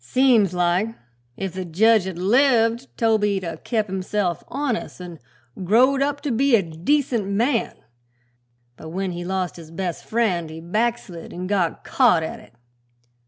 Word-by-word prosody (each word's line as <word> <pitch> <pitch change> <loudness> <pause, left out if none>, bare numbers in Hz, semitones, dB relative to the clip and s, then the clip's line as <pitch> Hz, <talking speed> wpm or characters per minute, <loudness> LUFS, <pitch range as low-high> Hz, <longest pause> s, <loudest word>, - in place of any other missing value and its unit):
Seems 245 -7 +3
like 180 +6 +1 0.4
if 195 -3 -4
the 185 0 -4
jedge 205 +4 +3
had 190 -3 -5
lived 235 +4 +3
Toby'd 210 -4 +1
'a' 165 -2 -5
kep' 220 +4 -1
himself 190 -2 -2
honest, 265 -7 -3
an' 175 -3 -9 0.4
growed 255 +8 +4
up 285 0 0
to 290 - -2
be 255 +2 +3
a 205 - +2
decent 215 - 0
man; 230 +5 0 1.0
but 160 - -10
when 190 +2 -3
he 175 0 -5
lost 185 -1 -3
his 165 -2 -11
best 175 0 -4
friend 190 -8 0
he 160 +1 -8
backslid 200 0 -3
an' 180 +1 -6
got 185 -4 -1
caught 225 -11 +3
at 160 - -5
it." - - -19
200 Hz, 155 wpm, -22 LUFS, 175-235 Hz, 1.0 s, growed